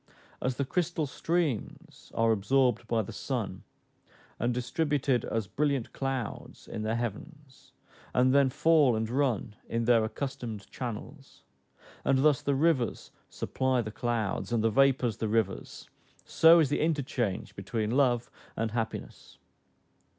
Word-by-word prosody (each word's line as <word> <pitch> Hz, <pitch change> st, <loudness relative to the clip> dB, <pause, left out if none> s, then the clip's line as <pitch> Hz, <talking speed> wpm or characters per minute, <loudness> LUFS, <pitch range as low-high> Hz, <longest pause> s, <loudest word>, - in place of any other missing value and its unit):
As 130 Hz, 0 st, -1 dB
the 140 Hz, -, -1 dB
crystal 170 Hz, +1 st, -1 dB
streams 155 Hz, -3 st, -3 dB
are 115 Hz, 0 st, +3 dB
absorbed 120 Hz, +2 st, +2 dB
by 115 Hz, -1 st, +1 dB
the -, -, -8 dB
sun, -, -, -3 dB, 0.8 s
and 120 Hz, +2 st, +1 dB
distributed 130 Hz, 0 st, 0 dB
as 115 Hz, -2 st, -2 dB
brilliant 140 Hz, +3 st, -1 dB
clouds 135 Hz, -4 st, -4 dB
in -, -, -5 dB
the 110 Hz, +1 st, -1 dB
heavens, 130 Hz, +5 st, -7 dB, 0.4 s
and 130 Hz, +1 st, +3 dB
then 140 Hz, -1 st, +5 dB
fall 150 Hz, -3 st, +4 dB
and 110 Hz, 0 st, -1 dB
run 120 Hz, -4 st, 0 dB
in 115 Hz, 0 st, -1 dB
their 115 Hz, -2 st, +5 dB
accustomed 110 Hz, -2 st, -5 dB
channels, 130 Hz, +4 st, -7 dB, 0.6 s
and 135 Hz, 0 st, +2 dB
thus 150 Hz, -4 st, +4 dB
the 140 Hz, -, 0 dB
rivers 140 Hz, -4 st, +1 dB, 0.2 s
supply 130 Hz, -1 st, 0 dB
the 110 Hz, -, -6 dB
clouds, 115 Hz, -2 st, -2 dB
and 115 Hz, -2 st, +1 dB
the 115 Hz, -, +3 dB
vapors 130 Hz, -2 st, +3 dB
the 110 Hz, -, -2 dB
rivers, 110 Hz, -3 st, -2 dB, 0.4 s
so 165 Hz, +1 st, +6 dB
is 155 Hz, -5 st, +4 dB
the 145 Hz, -, 0 dB
interchange 135 Hz, -, -1 dB
between 105 Hz, +2 st, -2 dB
love 125 Hz, -3 st, +2 dB, 0.3 s
and 115 Hz, 0 st, -1 dB
happiness. 115 Hz, -1 st, -5 dB
125 Hz, 135 wpm, -29 LUFS, 115-140 Hz, 0.8 s, so